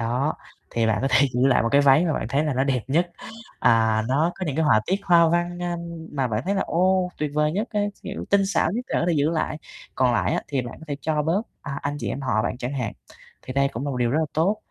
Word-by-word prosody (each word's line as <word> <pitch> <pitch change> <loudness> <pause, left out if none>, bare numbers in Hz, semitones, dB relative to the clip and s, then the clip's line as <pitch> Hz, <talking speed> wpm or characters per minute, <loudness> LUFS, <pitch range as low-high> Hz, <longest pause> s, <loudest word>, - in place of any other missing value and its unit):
Đó, 125 +6 0 0.4
thì 115 -1 +1
bạn 110 -1 +1
có 135 - +1
thể 130 +3 +5
giữ 125 +2 +3
lại 130 - +4
1 115 - +1
cái 140 - +6
váy 145 +3 +5
mà 165 - +1
bạn 110 - -2
thấy 140 +4 +1
là 150 -3 -1
nó 130 +2 +1
đẹp 130 -3 +1
nhất, 170 +5 +1 0.5
à, 110 -1 +3
nó 155 +6 +2
có 185 - -5
những 145 -2 -3
cái 160 - +2
họa 110 -7 +4
tiết 195 +3 0
hoa 170 -3 +5
văn, 175 +1 -1
a, 175 -1 -2 0.4
mà 135 -3 0
bạn 110 +2 -1
thấy 195 - 0
là 195 - +1
ô 185 +1 +2
tuyệt 150 -1 -1
vời 150 0 +2
nhất 210 +7 -2
á, 210 - 0 0.2
kiểu, - - -6
tinh 200 -1 +4
xảo 195 -4 +1
nhất 245 +4 -3
để - - -4
có - - 0
thể - - +3
giữ 145 +2 +2
lại. 155 -2 -2 0.4
Còn 130 -2 +2
lại 120 - +1
á, - - -1
thì 140 -3 -1
bạn 120 - -7
có 160 - -10
thể 145 - -2
cho 155 -1 0
bớt, 170 +8 +1 0.2
à, 140 -1 -5
anh 145 +1 -2
chị - - -4
em 140 - -3
họ 110 -5 0
bạn 125 - -3
chẳng 125 +1 -4
hạn, 125 -6 -3 0.5
thì 130 - -7
đây 140 +1 +2
cũng 130 +1 -5
là 145 - -2
một 130 - -3
điều 120 -1 +1
rất 145 - +1
là - - +1
tốt. 185 +7 +2
145 Hz, 290 wpm, -24 LUFS, 130-170 Hz, 0.5 s, cái